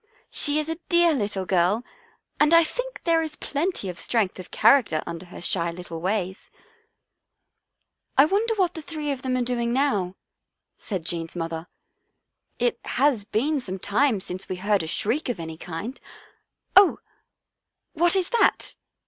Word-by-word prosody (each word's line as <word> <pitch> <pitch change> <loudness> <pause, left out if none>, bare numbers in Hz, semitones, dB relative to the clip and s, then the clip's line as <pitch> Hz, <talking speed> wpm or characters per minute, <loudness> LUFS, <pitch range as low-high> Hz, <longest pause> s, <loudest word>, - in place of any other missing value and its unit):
" - - -35
She 290 0 +4
is 305 0 -1
a 325 +1 -4
dear 345 -1 +5
little 205 -7 -1
girl 185 +5 +2 0.6
and 300 +3 +5
I 335 - +7
think - - -5
there 330 -1 +3
is 315 -2 -4
plenty 300 - -2
of 180 -1 -5
strength 215 -6 0
of 180 - -9
character 220 - +4
under 170 +1 -7
her 175 - -10
shy 170 -1 +1
little 170 -1 -8
ways." 190 0 -2 0.9
" - - -43
I 275 - +8
wonder 425 +7 +1
what 365 -4 +1
the 320 - -7
three 305 -3 -4
are - - 0 0.3
doing 240 -1 -1
now," 225 -9 0 0.6
said 185 -6 -5
Jean's 165 -1 -2
mother. 165 0 -4 0.5
" - - -52
It 475 - -2 0.2
has 265 -8 +3
been 285 +9 0
some 190 -7 -4
time 215 +4 +1
since 185 0 -6
we 185 - -2
heard 200 +1 +1
a 160 - -5
shriek 230 - -1
of 240 - -3
any 160 -1 -6
kind 175 +10 -6 0.4
— - - -48
oh 390 0 +7 0.5
— - - -59
what 345 +2 +3
is 370 -2 0
that?" 470 - +2
230 Hz, 170 wpm, -25 LUFS, -, 0.9 s, I